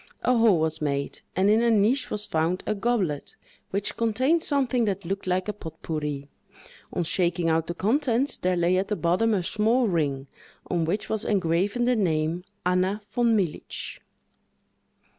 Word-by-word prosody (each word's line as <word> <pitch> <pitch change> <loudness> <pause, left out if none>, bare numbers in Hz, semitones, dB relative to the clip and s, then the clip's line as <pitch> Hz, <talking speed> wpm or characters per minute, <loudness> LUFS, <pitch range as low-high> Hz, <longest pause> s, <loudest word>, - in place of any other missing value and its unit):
A 250 - +3
hole 225 -7 +5
was 160 0 -1
made, 140 -1 -2
and 190 +2 +3
in 215 +2 +4
a 235 - +3
niche 225 +5 +2
was 210 0 -1
found 165 +3 0
a - - 0
goblet, 200 -9 -1 0.3
which 200 +1 -2
contained 255 +9 +2
something 260 -6 +1
that 195 -3 -2
looked 195 +2 -3
like 185 +1 0
a 210 - -1
pot 160 -6 -10
pourri. 150 -3 -3 0.6
On 175 - -1
shaking 170 0 +1
out 160 0 +1
the 170 - -4
contents, 250 - +1
there 180 0 +1
lay 175 +2 +2
at 190 +1 0
the 210 - -1
bottom 185 +6 +1
a 185 - 0
small 225 +6 +2
ring, 145 -7 0 0.4
on 170 -2 0
which 195 +6 -2
was 220 -1 -1
engraven 195 +4 +1
the 250 0 +3
name 165 -4 0 0.2
Anna 185 +3 +1
Von 235 -2 +3
Militz. 175 -7 -4
190 Hz, 170 wpm, -26 LUFS, 170-225 Hz, 0.6 s, hole